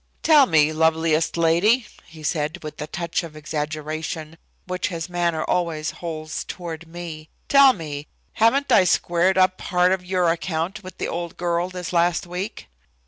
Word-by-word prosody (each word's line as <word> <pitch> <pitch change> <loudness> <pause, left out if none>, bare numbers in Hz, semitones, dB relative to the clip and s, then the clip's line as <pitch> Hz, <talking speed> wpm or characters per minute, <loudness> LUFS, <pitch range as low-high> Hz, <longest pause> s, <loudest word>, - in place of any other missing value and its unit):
"Tell 300 -4 +6
me, 155 -1 +4
loveliest 160 0 +2
lady," 175 +9 +3 0.2
he 160 -1 -13
said, 155 +3 -2
with 155 - -7
the 150 - -5
touch 170 +1 -2
of 165 -3 -9
exaggeration 155 +1 -4 0.3
which 185 0 -2
his 165 -4 -4
manner 170 -3 0
always 165 -3 -1
holds 155 -2 -4
toward 170 -2 -7
me, 165 -2 -8 0.2
"tell 275 -1 +7
me, 150 -5 -7 0.3
haven't 270 +5 +3
I 225 - +7
squared 180 +1 +2
up 185 0 +3
part 180 0 +2
of 190 -1 0
your 180 -1 +1
account 170 +4 -3
with 185 - -10
the - - -2
old 170 0 -5
girl 175 0 0
this 180 -1 -6
last 170 0 +2
week?" 180 +5 -6
170 Hz, 160 wpm, -23 LUFS, 160-180 Hz, 0.3 s, tell